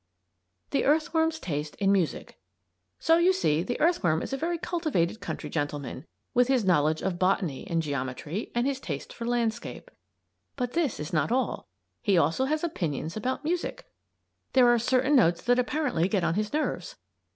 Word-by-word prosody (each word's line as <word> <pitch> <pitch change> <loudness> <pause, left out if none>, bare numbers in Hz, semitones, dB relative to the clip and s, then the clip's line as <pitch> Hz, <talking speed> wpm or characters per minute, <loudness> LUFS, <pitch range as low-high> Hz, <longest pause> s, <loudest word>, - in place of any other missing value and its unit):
THE 275 - +1
EARTHWORM'S 320 +2 +2
TASTE 150 - -4
IN 195 -1 +2
MUSIC 185 -5 -1 0.6
So 325 +1 +4
you 350 +2 +5
see 165 - +1
the 245 +7 -3
earthworm 175 - +2
is - - -5
a - - +2
very 335 +5 -1
cultivated 310 - -1
country - - -5
gentleman 145 -1 -4 0.3
with 245 -1 +4
his 260 -5 +2
knowledge 155 -3 +2
of 180 -2 -2
Botany 185 -6 0
and 165 -1 0
Geometry, 145 - -4
and 240 +1 +2
his 275 -1 -1
taste 145 - -6
for 235 - -6
landscape. 235 - -2 0.6
But 250 -2 -3
this 320 -7 0
is 150 +2 -6
not 160 +7 +1
all. 260 +1 -1 0.3
He 200 -4 +2
also 165 - +2
has 305 +3 -1
opinions 165 - -2
about 255 +6 -2
music. 345 +3 -2 0.7
There 250 -2 +6
are 240 -1 +4
certain 260 +4 +2
notes 175 -9 +4
that 245 +1 +3
apparently 250 - +1
get 195 -3 0
on 165 - +1
his 210 +3 -1
nerves. 310 +11 -2
235 Hz, 170 wpm, -27 LUFS, -, 0.7 s, There